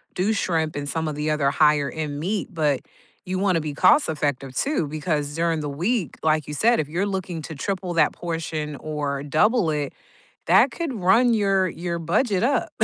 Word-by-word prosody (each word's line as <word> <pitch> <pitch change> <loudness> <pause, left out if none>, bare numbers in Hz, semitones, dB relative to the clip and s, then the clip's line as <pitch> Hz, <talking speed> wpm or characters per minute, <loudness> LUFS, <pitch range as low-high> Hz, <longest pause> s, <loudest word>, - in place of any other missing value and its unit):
do 200 +5 +1
shrimp, 160 -5 -1
and 145 0 -4
some 160 +1 -2
of 150 - -3
the 150 +1 -1
other 140 -2 +1
higher 150 -2 +3
end 150 -2 -4
meat, 195 +5 -2
but 150 -5 +1 0.4
you 185 0 -2
wanna 185 -5 +2
be 150 -2 -4
cost 185 - +4
effective 145 -4 -2
too 275 - 0
because 150 -1 -2
during 165 -2 0
the 145 - -3
week, 175 - -1
like 155 -2 +2
you 150 - -6
said, 230 +10 +3
if 145 - -7
you're 180 +5 -1
looking 185 -4 -4
to 160 - -7
triple 185 +2 -3
that 165 - +3
portion 160 -3 -4
or 145 -2 -3
double 185 - +2
it, 145 -2 -2 0.5
that - - +5
could 330 -6 -4
run 230 +5 +3
your 195 -3 +2
your 170 0 -4
budget 190 +5 +1
up. 280 +3 +1
165 Hz, 190 wpm, -23 LUFS, 150-190 Hz, 0.5 s, that